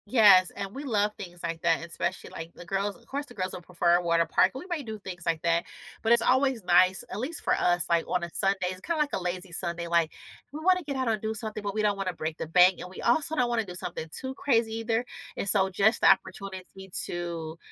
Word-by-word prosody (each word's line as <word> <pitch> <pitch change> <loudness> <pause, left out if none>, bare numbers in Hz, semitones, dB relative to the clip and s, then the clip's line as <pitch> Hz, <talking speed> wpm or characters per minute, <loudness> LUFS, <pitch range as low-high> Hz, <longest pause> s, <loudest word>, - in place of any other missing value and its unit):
Yes, 205 -5 +7
and 200 0 -5
we 275 - -6
love 210 -6 +1
things 175 -3 -9
like 165 -1 -3
that, 165 -1 +1
especially 170 - -4
like 165 +1 -7
the 175 - -11
girls 195 +3 -1
Of 235 - -23
course, 285 +4 -4
the 245 - -14
girls 185 0 -2
will 180 - -7
prefer 175 0 +2
a - - -1
water 170 -1 +3
park, 185 - +3
we 270 - -6
might 335 -7 -3
do 220 -1 -5
things 185 -4 -8
like 165 -1 0
that, 170 0 +2 0.4
but 225 - +1
it's 235 -1 +5
always 260 -3 +2
nice, 185 +1 +4
at - - -4
least 285 +7 -4
for - - +2
us, 175 -1 +2
like, 170 -1 +2
on 180 - 0
a 170 - -4
Sunday. 195 -1 +1
It's 185 0 -9
kinda 335 - -2
like 295 -1 0
a - - -1
lazy 180 +1 -4
Sunday, 170 0 -3
like, 170 -1 +2 0.4
we 295 - -6
wanna 365 +1 +4
get 280 -2 -4
out 260 -1 -1
and 220 -2 0
do 220 0 -2
something, 215 -1 -5
but 200 0 -4
we 215 - 0
don't 205 -1 +2
wanna 190 -2 -2
break 160 -1 -4
the - - -4
bank, 180 +3 +5
and 180 - -7
we 185 - -11
also 310 +6 +2
don't 250 -5 +2
wanna 235 -2 0
do 180 -2 -8
something 160 -2 -5
too 260 +10 -6
crazy 230 -5 +1
either, 225 +1 -1 0.3
and - - -2
so 195 -1 +3
just 200 +4 +2
the - - +6
opportunity 190 0 -1 0.2
to 170 -2 -5
195 Hz, 255 wpm, -28 LUFS, 175-230 Hz, 0.4 s, Yes